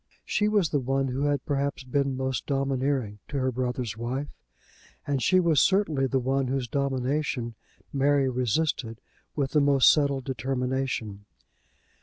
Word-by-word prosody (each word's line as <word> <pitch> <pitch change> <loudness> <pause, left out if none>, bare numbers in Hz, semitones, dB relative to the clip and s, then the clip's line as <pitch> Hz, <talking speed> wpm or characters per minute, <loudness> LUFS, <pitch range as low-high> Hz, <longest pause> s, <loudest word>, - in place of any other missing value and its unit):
She 210 - +1
was 205 -6 +2
the 145 - +1
one 135 +1 0
who 135 +3 -1
had 145 -2 0
perhaps 140 -1 -1
been 135 +1 -1
most 130 -2 -2
domineering 135 -5 -1
to 145 - -4
her 130 -1 +1
brother's 125 -3 -2
wife, 125 +5 -3 0.8
and 140 -2 -1
she 185 +6 +4
was 165 -5 +3
certainly 160 -9 +2
the 135 - 0
one 135 +1 0
whose 130 -1 -1
domination 135 -1 -1 0.4
Mary 140 0 +3
resisted 125 -1 -1 0.4
with 140 -3 -1
the 150 - +3
most 140 -2 +6
settled 140 -3 +1
determination. 125 -5 -3
135 Hz, 145 wpm, -27 LUFS, 125-140 Hz, 0.8 s, most